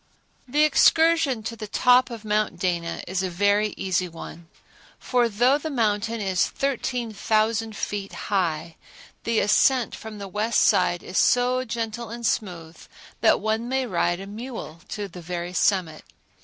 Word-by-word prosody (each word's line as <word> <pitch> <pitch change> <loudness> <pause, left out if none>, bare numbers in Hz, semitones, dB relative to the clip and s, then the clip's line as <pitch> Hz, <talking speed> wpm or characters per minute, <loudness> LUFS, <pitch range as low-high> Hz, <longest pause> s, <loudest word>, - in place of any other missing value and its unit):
The 295 +4 +3
excursion 310 -4 +4
to 230 +1 -5
the 215 -2 -7
top 250 +4 +4
of 230 -2 -8
Mount 215 0 0
Dana 170 -3 -2
is 185 0 -1
a 190 - -2
very 205 +3 +1
easy 185 -1 -1
one; 165 0 -10 0.5
for 245 -2 +1
though 245 +7 +3
the 315 - -4
mountain 225 -3 0
is 190 -3 +1
13,000 225 -4 -1
feet 200 -2 -4
high, 170 -4 -2 0.5
the 230 -1 +2
ascent 245 +4 +3
from 220 -1 -8
the 200 -1 -7
west 210 +3 0
side 175 -1 +3
is 185 - -1
so 250 +1 +3
gentle 230 -1 -4
and 235 +1 -6
smooth 175 -8 -3 0.4
that - - +4
one 220 +2 -1
may 265 0 0
ride 175 -4 0
a 195 - -7
mule 210 -6 -8
to 205 -2 -4
the 180 -1 -11
very 175 +1 -5
summit. 180 -4 +1
215 Hz, 155 wpm, -24 LUFS, 185-235 Hz, 0.5 s, excursion